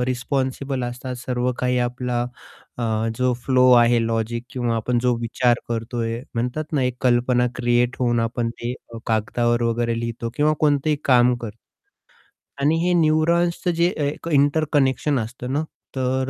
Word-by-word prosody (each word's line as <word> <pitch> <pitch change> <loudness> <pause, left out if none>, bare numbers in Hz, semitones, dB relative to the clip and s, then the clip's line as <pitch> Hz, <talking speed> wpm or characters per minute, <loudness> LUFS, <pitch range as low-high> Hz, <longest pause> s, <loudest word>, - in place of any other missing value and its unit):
अ, - - +2
responsible 130 +1 -2
असतात 125 +1 -5
सर्व 125 0 -1
काही 125 0 +1
आपला 125 -1 -2 0.6
अ, - - -2 0.4
जो 125 0 +2
फ्लो 130 -1 +4
आहे, 120 0 +5
लॉजिक 115 +1 -2
किंवा 120 -1 -1
आपण 120 +2 0
जो 125 -1 +2
विचार 120 +1 +1
करतोय. 115 0 -3
म्हणतात 125 +7 -3
ना 145 -4 +1
एक 125 -1 -1
कल्पना 125 0 +3
क्रिएट 120 0 +1
होऊन 120 -2 +2
आपण 115 0 -1
ते 120 +1 -3 0.3
कागदावर 120 +2 +1
वगैरे 115 0 0
लिहितो 115 0 -4
किंवा 150 +1 +3
कोणतेही 150 0 +2
काम 125 -1 +5
कर 115 - -4 1.1
आणि 145 +3 +3
हे 180 - +2
न्यूरॉन्सचं 170 +3 +2
जे 170 - +4
अ, - - -3
एक 145 +3 -3
इंटरकनेक्शन 145 -2 +2
असतं 125 +3 -5
ना, 150 +2 0 0.3
तर 130 0 0
125 Hz, 150 wpm, -22 LUFS, 120-135 Hz, 1.1 s, आहे